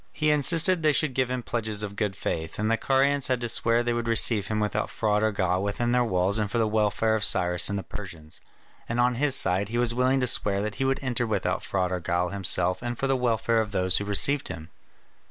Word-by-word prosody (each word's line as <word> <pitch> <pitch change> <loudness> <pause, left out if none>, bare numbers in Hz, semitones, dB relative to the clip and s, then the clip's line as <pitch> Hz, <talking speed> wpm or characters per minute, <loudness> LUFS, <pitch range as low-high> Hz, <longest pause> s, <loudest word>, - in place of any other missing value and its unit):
He 155 -1 0
insisted 165 +4 +2
they 155 -1 +3
should 150 -2 +1
give 130 -1 0
him 125 -1 -3
pledges 110 -3 -3
of 100 -1 -6
good 105 -2 -2
faith, 80 -5 -4
and 110 +1 -1
the - - +3
Carians 135 +3 +1
had 130 -1 0
to 120 - -2
swear 115 +1 +1
they 120 0 -1
would 120 0 -3
receive 115 -2 +2
him 110 -1 -2
without 105 0 -1
fraud 105 -1 0
or 110 0 +1
guile 95 -2 0
within 100 +4 -1
their 125 0 +3
walls 95 -1 0
and 105 -1 -1
for 120 - -2
the 115 -1 +2
welfare 110 +1 +1
of 110 -2 -1
Cyrus 90 -3 +3
and 100 - -2
the 100 - -4
Persians; 85 -6 -9 0.5
and 115 +1 -2
on 125 +1 +3
his 135 +2 +1
side 95 -3 +1
he 120 - -3
was 120 -1 +1
willing 130 +2 +1
to 125 - +1
swear 100 -5 +2
that 105 -1 -5
he - - +2
would 135 0 0
enter 120 -2 -1
without 95 -4 -1
fraud 95 -2 -1
or 90 - -2
guile 85 +1 -1
himself 90 -1 +1
and 120 -1 -4
for - - -2
the 135 0 +1
welfare 115 -2 +1
of 105 -2 -5
those 95 -1 +2
who - - -3
received 130 +8 0
him. 80 -2 -8
110 Hz, 245 wpm, -26 LUFS, 100-125 Hz, 0.5 s, they